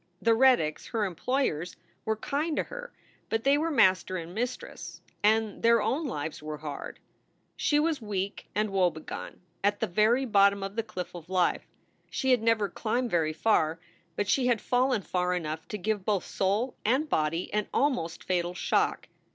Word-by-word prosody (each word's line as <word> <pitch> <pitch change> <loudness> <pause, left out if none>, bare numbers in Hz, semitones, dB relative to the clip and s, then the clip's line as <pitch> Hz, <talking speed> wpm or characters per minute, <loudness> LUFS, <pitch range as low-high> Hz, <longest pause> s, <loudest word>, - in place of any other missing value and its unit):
The 230 - +3
Reddicks, 230 -11 +3
her 220 -2 0
employers, 180 - -1 0.3
were 220 - +1
kind 295 +8 -2
to - - +2
her, - - -8 0.4
but 225 0 0
they 275 +1 +5
were 315 +3 0
master 185 - +3
and 170 0 -7
mistress, 245 +4 -5 0.2
and 215 0 +2
their 230 0 +5
own 290 +8 0
lives 155 - -4
were 155 0 -5
hard. 150 -2 -7 0.6
She 295 - +2
was 305 -2 +1
weak 200 -2 -4
and 215 0 0
woebegone, 175 -5 -2 0.2
at 205 0 +2
the 220 +8 +2
bottom 200 -3 +4
of 195 +1 -5
the 230 - +1
cliff 215 -5 -6
of 175 -1 -10
life. 185 -2 +1 0.4
She 265 -2 0
had 250 -3 +4
never 225 -2 +2
climbed 235 +5 -2
very 160 -2 +1
far, 165 -4 +2 0.4
but 205 - -1
she 250 +4 +2
had 240 -3 +3
fallen 250 -3 +1
far 180 0 0
enough 160 -2 -4
to 210 - -4
give 205 0 -1
both 200 -2 0
soul 205 +7 0
and 260 +8 +2
body 165 - -1
an 210 0 0
almost 245 - 0
fatal 175 -1 -1
shock. - - 0
210 Hz, 170 wpm, -28 LUFS, 180-245 Hz, 0.6 s, they